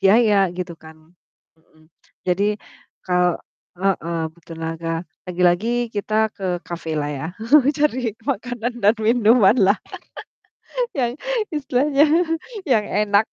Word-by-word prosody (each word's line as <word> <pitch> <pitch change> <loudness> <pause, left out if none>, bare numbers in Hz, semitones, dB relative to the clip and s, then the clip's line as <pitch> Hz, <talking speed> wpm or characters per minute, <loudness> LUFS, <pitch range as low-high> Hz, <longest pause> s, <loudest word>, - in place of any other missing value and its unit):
biaya 200 -1 +4
gitu 180 -1 -4
kan. 160 0 -13 0.6
Mhm. 155 0 -27 0.3
Jadi 200 +4 +1 0.5
kal 180 -1 +2 0.4
heeh, 175 -3 -1
butuh 170 0 -12
tenaga, 165 +1 -3 0.2
lagi-lagi 180 +4 +2 0.2
kita 215 +1 0
ke 195 - -9 0.2
kafe 165 -2 -5
lah 145 -1 -1
ya. 145 +2 -4 0.5
Cari 255 -7 0
makanan 240 +2 -3
dan 210 +3 +5
minuman 225 -1 +4
lah, 200 +2 +4 1.2
yang 245 -1 -1 0.3
istilahnya 285 0 +2 0.6
yang 225 -5 +3
enak. 210 +1 +2
200 Hz, 110 wpm, -21 LUFS, 175-230 Hz, 1.2 s, dan